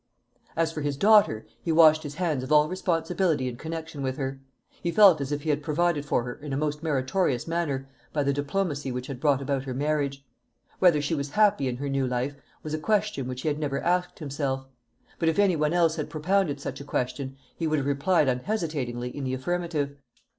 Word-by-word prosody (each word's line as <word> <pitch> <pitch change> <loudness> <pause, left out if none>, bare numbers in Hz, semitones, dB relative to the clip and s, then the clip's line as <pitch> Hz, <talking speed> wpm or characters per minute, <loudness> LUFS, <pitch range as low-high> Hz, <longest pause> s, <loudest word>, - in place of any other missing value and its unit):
As 165 -1 +2
for 155 - -5
his 145 -1 -2
daughter, 205 - +5 0.2
he 165 - -1
washed 155 -1 +6
his 145 -2 -7
hands 160 -6 0
of 130 - -6
all 150 0 +6
responsibility 165 -4 0
in 125 - -4
connection 160 +1 -6
with 130 -1 -2
her. 135 -1 -3 0.4
He 170 - -1
felt 185 -4 +6
as 140 +1 -3
if 145 0 -2
he 155 - +1
had 145 0 0
provided 155 -1 0
for 120 - +1
her 125 0 -5
in 150 +1 -9
a - - 0
most 150 0 -1
meritorious 140 -2 0
manner 150 -6 -1 0.2
by 145 - 0
the 140 0 +1
diplomacy 145 -1 -2
which 125 0 -4
had 135 -2 -6
brought 140 -1 +2
about 135 -1 -1
her 130 -2 -4
marriage. 140 -1 -1 0.5
Whether 170 -6 +5
she 145 - -1
was 140 -2 -2
happy 205 -6 +3
in 125 -1 -2
her 140 +2 -4
new 135 -1 0
life, 125 +3 -1 0.3
was 155 - -5
a 155 - -1
question 205 -6 0
which 130 0 -5
he - - -2
had 150 0 0
never 140 -2 -1
asked 180 +1 0
himself; 140 -3 -3 0.5
but 165 - +3
if 160 - -1
any 200 -3 +4
one 150 -1 +1
else 170 -2 +2
had - - -3
propounded 160 -1 0
such 140 - -5
a - - -6
question, 135 0 -3 0.2
he 165 - -2
would 155 0 +1
have 140 - -1
replied 145 +3 +2
unhesitatingly 125 - -2
in 145 - -4
the 130 0 -1
affirmative. 150 0 -2
145 Hz, 215 wpm, -27 LUFS, 135-165 Hz, 0.5 s, washed